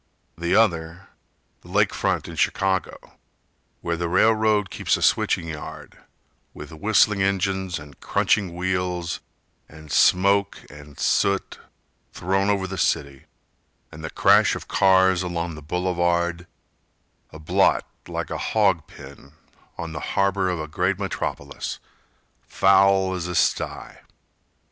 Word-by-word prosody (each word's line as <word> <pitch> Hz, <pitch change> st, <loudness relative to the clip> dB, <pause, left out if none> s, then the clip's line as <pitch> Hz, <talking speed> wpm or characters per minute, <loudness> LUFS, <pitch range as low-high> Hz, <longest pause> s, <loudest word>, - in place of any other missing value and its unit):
The 85 Hz, +1 st, -1 dB
other, 85 Hz, -4 st, +1 dB, 0.5 s
the -, -, -18 dB
lake -, -, +1 dB
front -, -, -1 dB
in -, -, -8 dB
Chicago, 95 Hz, -1 st, 0 dB, 0.8 s
Where 85 Hz, 0 st, -2 dB
the 85 Hz, 0 st, -2 dB
railroad 110 Hz, +1 st, +2 dB
keeps -, -, 0 dB
a -, -, -8 dB
switching 85 Hz, -, +2 dB
yard, 75 Hz, -2 st, -8 dB, 0.6 s
With 75 Hz, +2 st, -10 dB
whistling 105 Hz, +3 st, +2 dB
engines 95 Hz, -2 st, 0 dB
and 75 Hz, -2 st, -13 dB
crunching 95 Hz, -5 st, 0 dB
wheels 90 Hz, -1 st, -2 dB, 0.5 s
And 75 Hz, -1 st, -13 dB
smoke 100 Hz, +2 st, +3 dB
and 75 Hz, 0 st, -14 dB
soot 100 Hz, 0 st, 0 dB, 0.5 s
thrown 95 Hz, +3 st, 0 dB
over 100 Hz, -2 st, +1 dB
the 95 Hz, -1 st, -6 dB
city, 70 Hz, -5 st, -1 dB, 0.7 s
And 80 Hz, -, -11 dB
the 80 Hz, -, -4 dB
crash -, -, +4 dB
of -, -, -8 dB
cars 95 Hz, -1 st, +4 dB
along 85 Hz, -2 st, -3 dB
the 75 Hz, -, -10 dB
boulevard,— 85 Hz, +1 st, -1 dB, 0.8 s
A -, -, -10 dB
blot 80 Hz, -, +2 dB, 0.2 s
like -, -, -5 dB
a -, -, -3 dB
hog 95 Hz, -8 st, +1 dB
pen 70 Hz, -, -14 dB, 0.4 s
on 85 Hz, -1 st, -6 dB
the 75 Hz, -, -5 dB, 0.2 s
harbor 100 Hz, -1 st, +2 dB
Of 90 Hz, -2 st, -2 dB
a 80 Hz, -, -4 dB
great 90 Hz, +5 st, -1 dB
metropolis, 95 Hz, -7 st, -4 dB, 0.7 s
foul 95 Hz, -1 st, +3 dB
as 90 Hz, -2 st, -4 dB
a 90 Hz, -, -4 dB
sty. -, -, -1 dB
90 Hz, 130 wpm, -23 LUFS, 85-95 Hz, 0.8 s, crash